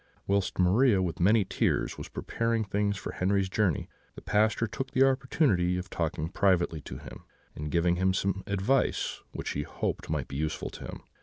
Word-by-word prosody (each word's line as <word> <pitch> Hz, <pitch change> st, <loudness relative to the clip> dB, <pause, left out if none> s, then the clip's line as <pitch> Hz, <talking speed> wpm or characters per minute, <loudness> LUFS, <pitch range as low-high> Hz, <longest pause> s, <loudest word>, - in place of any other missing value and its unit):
"Whilst 100 Hz, -1 st, 0 dB
Maria, 100 Hz, +4 st, +4 dB
with 90 Hz, -3 st, -2 dB
many 100 Hz, +3 st, +4 dB
tears, 95 Hz, -, 0 dB
was -, -, -8 dB
preparing 115 Hz, -1 st, -1 dB
things 100 Hz, 0 st, 0 dB
for -, -, -5 dB
Henri's 95 Hz, +1 st, +1 dB
journey, 95 Hz, -5 st, +1 dB, 0.3 s
the -, -, -11 dB
Pastor 110 Hz, +2 st, +2 dB
took 130 Hz, +5 st, -4 dB
the 135 Hz, 0 st, +4 dB
opportunity 125 Hz, -, +2 dB
of 90 Hz, +1 st, -6 dB
talking 80 Hz, -1 st, -2 dB
privately 85 Hz, -5 st, +2 dB
to 65 Hz, -, -8 dB
him, 60 Hz, -4 st, -11 dB, 0.3 s
and 75 Hz, 0 st, -5 dB
giving 85 Hz, +2 st, +2 dB
him 95 Hz, +1 st, +3 dB
some 95 Hz, +1 st, 0 dB
advice 100 Hz, +7 st, 0 dB
which -, -, -4 dB
he 70 Hz, -, -2 dB
hoped 70 Hz, -, -3 dB
might 75 Hz, -5 st, -1 dB
be 70 Hz, -, -6 dB
useful 75 Hz, +1 st, -2 dB
to -, -, -9 dB
him. -, -, -8 dB
95 Hz, 180 wpm, -29 LUFS, 85-105 Hz, 0.3 s, Maria